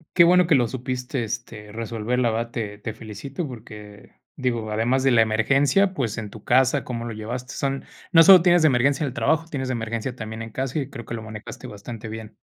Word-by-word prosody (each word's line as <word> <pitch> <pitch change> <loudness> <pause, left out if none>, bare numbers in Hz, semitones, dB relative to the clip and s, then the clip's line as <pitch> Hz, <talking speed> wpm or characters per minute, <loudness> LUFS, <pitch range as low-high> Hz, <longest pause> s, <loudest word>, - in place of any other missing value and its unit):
Qué 175 - +8
bueno 180 0 +5
que 165 - +5
lo 125 -3 +3
supiste 125 +1 -3
este, 110 -1 -6
resolver 115 +2 -3
la 120 -2 +2
verdad 115 +1 -2
te 105 -4 -4
te 110 +1 -5
felicito 115 - -6
porque, 105 -4 -11 0.2
digo, 120 -5 -2
además 120 +5 +1
de 135 - +4
la 115 -2 +5
emergencia, 135 - +3
pues, 120 - -2
en 105 -2 -5
tu 110 - -12
casa, 130 +2 +3
cómo 120 -2 -5
lo 115 - -5
llevaste 120 +5 -6
son, 135 0 -2 0.3
no 165 -3 +8
sólo 185 0 +9
tienes 175 -1 +4
de - - +7
emergencia 140 +3 +2
el 135 - -4
trabajo, 160 +4 +1
tienes 130 -4 -3
de 130 - -1
emergencia 115 +2 -3
también 110 -1 -6
en 115 - -6
casa, 135 +5 -2
y 135 -2 -4
creo 120 -4 -9
que - - -7
lo 115 - -4
manejaste 110 -1 -9
bastante 110 +2 -8
bien. 110 -1 -8
120 Hz, 220 wpm, -24 LUFS, 110-135 Hz, 0.3 s, sólo